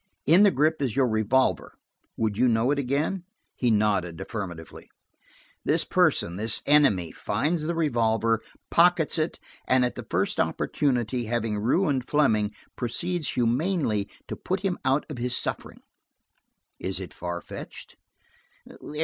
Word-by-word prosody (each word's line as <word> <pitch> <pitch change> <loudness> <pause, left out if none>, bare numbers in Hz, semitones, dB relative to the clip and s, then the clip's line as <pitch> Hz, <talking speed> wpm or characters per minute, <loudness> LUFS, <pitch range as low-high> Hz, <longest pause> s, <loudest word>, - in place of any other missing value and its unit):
In 170 +6 +6
the 205 - +7
grip 155 -1 +1
is 125 -5 -1
your 135 -2 +3
revolver; 110 +4 +1 0.4
would 110 -2 0
you 125 +4 +3
know 115 +2 +2
it 145 - 0
again?" 145 +8 -1 0.3
He 125 - 0
nodded 100 -6 +1
affirmatively. 90 -7 -7 0.7
"This - - +2
person–this 105 +6 +1
enemy 120 - +4
finds 160 +1 -1
the 165 +3 -2
revolver; 115 -7 +1 0.3
pockets 170 -1 +3
it 155 - -1 0.3
and 130 -1 +4
at 125 - -2
the - - -9
first - - 0
opportunity, 125 -4 0
having 110 -2 -1
ruined 135 - +1
Fleming, 110 -8 +2 0.2
proceeds 170 +7 -1
humanely 120 - 0 0.2
to - - -5
put 185 +2 -3
him 195 -3 -2
out 135 +2 +1
of 150 -6 -7
his 125 +1 +1
suffering. - - -3 1.0
Is 95 0 -2
it 95 - -8
far 85 0 -5
fetched?" - - -10
125 Hz, 135 wpm, -26 LUFS, 110-150 Hz, 1.0 s, the